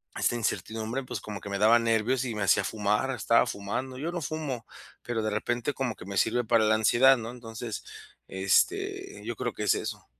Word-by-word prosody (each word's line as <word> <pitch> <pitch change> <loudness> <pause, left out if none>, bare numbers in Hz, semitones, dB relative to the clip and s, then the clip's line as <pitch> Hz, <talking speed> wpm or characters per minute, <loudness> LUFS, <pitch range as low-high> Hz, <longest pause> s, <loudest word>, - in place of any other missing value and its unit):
esta - - +1
incertidumbre, 110 +3 -2
pues, 125 - -5
como 105 -2 -7
que - - -7
me 100 0 -2
daba 110 +3 +6
nervios, 115 +3 +1
y 120 -3 -3
me 105 - -1
hacía 100 0 +4
fumar, 105 +5 0
estaba 115 -1 +3
fumando. 125 +6 -4
Yo 155 +6 -3
no 175 - -3
fumo, 140 -7 -4 0.4
pero 115 -2 -2
de 110 - -1
repente, 120 +5 -1
como 125 -4 -2
que - - -11
me 100 0 -6
sirve 120 +7 +2
para 115 0 +4
la 110 0 +4
ansiedad, 120 +5 +5
¿no? 115 0 -6
Entonces, 115 -2 -7 0.5
este, 390 - 0
yo - - -3
creo - - -2
que - - -5
es - - +3
eso. - - -5
115 Hz, 205 wpm, -28 LUFS, 105-130 Hz, 0.5 s, daba